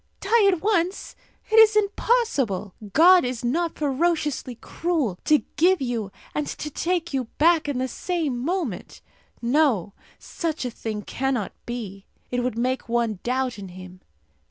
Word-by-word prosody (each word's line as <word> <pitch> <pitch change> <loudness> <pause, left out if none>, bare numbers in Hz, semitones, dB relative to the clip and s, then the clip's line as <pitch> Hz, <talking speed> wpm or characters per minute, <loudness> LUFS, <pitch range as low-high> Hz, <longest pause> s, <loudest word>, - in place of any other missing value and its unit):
Die 420 +1 +3
at 360 -2 -3
once! 390 -3 0 0.4
It 445 - +7
is 435 -1 +7
impossible! 400 - +1 0.2
God 355 - +7
is 250 -1 -3
not 330 +7 0
ferociously 295 -3 0
cruel 290 - -2
to 305 -1 +4
give 360 +3 +4
you 235 -6 -3 0.2
and 300 - -2
to 300 - -5
take 345 +1 -1
you 265 -2 0
back 325 -1 +4
in 280 - -2
the 260 +1 -1
same 310 -3 -2
moment. 330 - -3 0.4
No; 235 - +2 0.2
such 320 -5 -4
a 250 - -2
thing 215 -2 -5
cannot 255 -4 -2 0.2
be. 205 -5 -6 0.2
It 245 - 0
would 245 -2 -2
make 255 +1 -1
one 230 -4 0
doubt 255 -2 -1
in 195 - -7
Him. 185 0 -12
270 Hz, 150 wpm, -24 LUFS, 235-345 Hz, 0.4 s, It